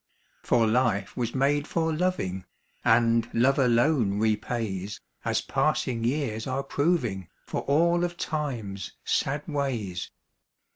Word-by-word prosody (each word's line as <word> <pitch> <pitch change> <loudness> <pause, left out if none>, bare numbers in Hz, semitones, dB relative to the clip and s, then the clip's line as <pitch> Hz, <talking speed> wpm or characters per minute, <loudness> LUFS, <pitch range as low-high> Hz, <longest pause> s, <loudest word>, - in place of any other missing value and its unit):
For 120 -2 +3
life 110 -4 +1
was 120 0 -2
made 145 +2 +2
for 160 -1 0
loving, 155 - -1 0.4
and 115 0 +3
love 135 +5 +3
alone 120 -4 +3
repays, 105 -2 -1 0.2
As - - +1
passing 115 -3 0
years 120 -3 -1
are 135 +1 -1
proving, 125 - 0 0.2
for - - -3
all 170 +5 +3
of 175 -1 -2
Time's 120 - -3
sad 145 +2 0
ways. 120 - -2
120 Hz, 115 wpm, -27 LUFS, 110-145 Hz, 0.4 s, For